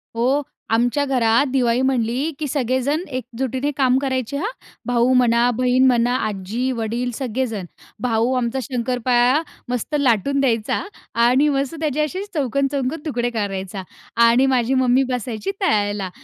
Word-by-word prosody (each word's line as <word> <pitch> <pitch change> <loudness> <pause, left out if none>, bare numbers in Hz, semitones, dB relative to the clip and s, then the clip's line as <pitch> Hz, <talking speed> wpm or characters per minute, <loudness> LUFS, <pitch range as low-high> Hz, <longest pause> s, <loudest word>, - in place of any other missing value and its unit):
हो, 260 +5 +2 0.3
आमच्या 245 +5 +2
घरात 240 -1 +3
दिवाळी 250 -2 +2
म्हणली 260 +3 0
की 300 - -2
सगळेजण 260 +3 0
एकजुटीने 255 +1 -3
काम 260 -2 +3
करायचे 265 0 -2
हां. 415 +10 -2 0.4
भाऊ 245 +1 +3
म्हणा, 245 -1 +4
बहीण 255 +1 +3
म्हणा, 245 0 +3
आजी, 215 +6 -3
वडील 235 +1 -2
सगळेजण. 235 -6 -3 0.4
भाऊ 235 0 +1
आमचा 250 +1 -1
शंकरपाळ्या 250 +2 +1 0.3
मस्त 250 +4 -2
लाटून 275 +2 +2
द्यायचा 230 -5 +1 0.4
आणि 265 +5 +4
मस्त 275 +2 -1
त्याची 305 -1 -1
अशी 365 +6 -1
चौकन-चौकन 275 +1 -1
तुकडे 245 -4 -1
करायचा 195 -3 -4 0.4
आणि 240 +3 +4
माझी 255 -1 +1
मम्मी 260 0 +3
बसायची 235 - -3
तळायला 205 - +1
250 Hz, 135 wpm, -21 LUFS, 235-270 Hz, 0.4 s, म्हणा